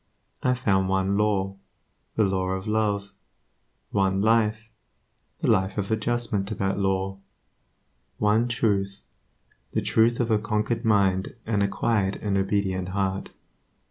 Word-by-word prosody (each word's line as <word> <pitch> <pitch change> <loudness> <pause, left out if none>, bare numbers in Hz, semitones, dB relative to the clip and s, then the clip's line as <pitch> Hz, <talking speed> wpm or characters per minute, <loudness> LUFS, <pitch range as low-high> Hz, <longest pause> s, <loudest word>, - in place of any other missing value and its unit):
I 125 0 +2
found 95 -6 +1
one 95 +1 +1
Law, 100 -2 0 0.6
the 110 - +3
Law 95 -2 0
of 95 0 -4
Love; 105 -2 0 0.8
one 95 -1 +1
Life, 110 +1 +2 0.7
the - - 0
Life 95 +2 +2
of 100 +1 -2
adjustment 110 -2 0
to 110 - -3
that 95 0 -1
Law; 95 0 -1 1.0
one 105 +3 +2
Truth, 100 -4 0 0.7
the - - +1
truth 115 +1 +3
of 120 -2 0
a 110 - +4
conquered 110 +2 -1
mind 100 -3 +2
and 105 -2 0
a 100 - +3
quiet 100 0 0
and 100 -2 -2
obedient 95 -2 0
heart. 95 0 -2
100 Hz, 135 wpm, -25 LUFS, 95-110 Hz, 1.0 s, a